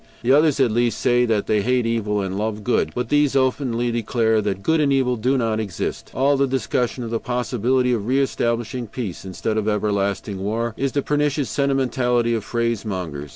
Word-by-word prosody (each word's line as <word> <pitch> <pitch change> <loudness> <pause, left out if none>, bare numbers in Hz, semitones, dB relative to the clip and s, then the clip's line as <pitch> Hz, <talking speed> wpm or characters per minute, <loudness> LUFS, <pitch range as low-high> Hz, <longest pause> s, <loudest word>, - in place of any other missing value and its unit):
The 120 - +2
others, 150 0 +4
at 130 -4 +3
least, 120 +1 +1
say 120 0 +3
that 110 -3 +1
they 105 -1 +1
hate 125 +2 +1
evil, 105 -3 0
and 95 -1 -3
love 105 +1 -3
good, 125 - +1
but 125 -1 -2
these 145 -2 +2
openly 125 -3 +1
declare 110 -1 +1
that 100 -2 -3
good 160 -1 +2
and 140 -2 +2
evil 130 -2 +2
do 125 +4 +1
not 115 -3 0
exist. 100 -5 -4
All 140 +3 +3
discussion 130 -2 0
of 115 - -5
the 115 - 0
possibility 125 +1 0
of 110 -3 -2
re 130 +2 +2
establishing 120 -2 -1
peace 105 -5 -6
instead 100 +4 -3
of 105 - -3
everlasting 100 -2 -1
war 110 +4 -2
is 135 0 -2
the 140 - 0
pernicious 145 -1 0
sentimentality 125 -4 +1
of 110 -3 -1
phrasemongers. 95 -11 -3
120 Hz, 190 wpm, -22 LUFS, 110-130 Hz, -, others